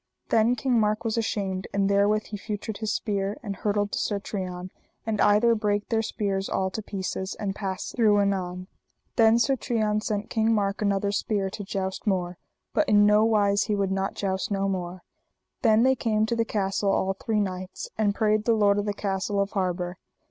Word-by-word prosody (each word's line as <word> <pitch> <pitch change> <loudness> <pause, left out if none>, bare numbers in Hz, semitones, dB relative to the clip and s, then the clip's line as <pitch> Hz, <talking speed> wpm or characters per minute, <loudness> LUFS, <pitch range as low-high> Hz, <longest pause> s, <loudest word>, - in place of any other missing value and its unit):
Then 230 +2 +3
King 250 0 +1
Mark 215 0 +1
was 220 - 0
ashamed, 195 -4 -2
and 200 -1 +2
therewith 205 +2 +3
he 210 - -7
feutred 210 0 -5
his 220 -1 -1
spear, 200 -2 -2
and 200 -3 -4
hurtled 205 +1 -1
to - - -1
Sir 205 -2 -1
Trian, 185 -2 -5 0.3
and 220 -2 -1
either 210 +3 +5
brake 210 -2 -1
their 225 -1 +2
spears 200 -3 -2
all 190 0 0
to 220 - -4
pieces, 190 -2 -4
and 200 -2 -2
passed 195 -2 -4
through 215 -4 +4
anon. 185 -2 -1 0.5
Then 225 -1 +5
Sir 270 +3 +2
Trian 215 -4 0
sent 210 0 -3
King 225 0 +2
Mark 200 -1 -1
another 200 -1 +1
spear 200 -2 -1
to 205 - -6
joust 190 +1 -4
more; 180 -3 -1 0.3
but 305 - +2
in 205 0 +6
no 210 +1 +5
wise 205 -2 +3
he 210 - 0
would 195 -1 0
not 195 0 -1
joust 190 -1 -2
no 195 -1 0
more. 180 -1 -4 0.6
Then 225 -2 +4
they 265 +1 +5
came 220 -4 +1
to 235 +1 -1
the 230 0 +1
castle 195 -2 0
all 190 0 +1
three 215 +2 -1
knights, 185 -2 -4
and 205 -2 +1
prayed 215 0 +1
the 230 - +3
lord 205 -1 +3
of 205 - -2
the 205 -1 -2
castle 200 0 -1
of 200 +1 0
harbour. 180 -2 -2
205 Hz, 200 wpm, -26 LUFS, 195-215 Hz, 0.6 s, in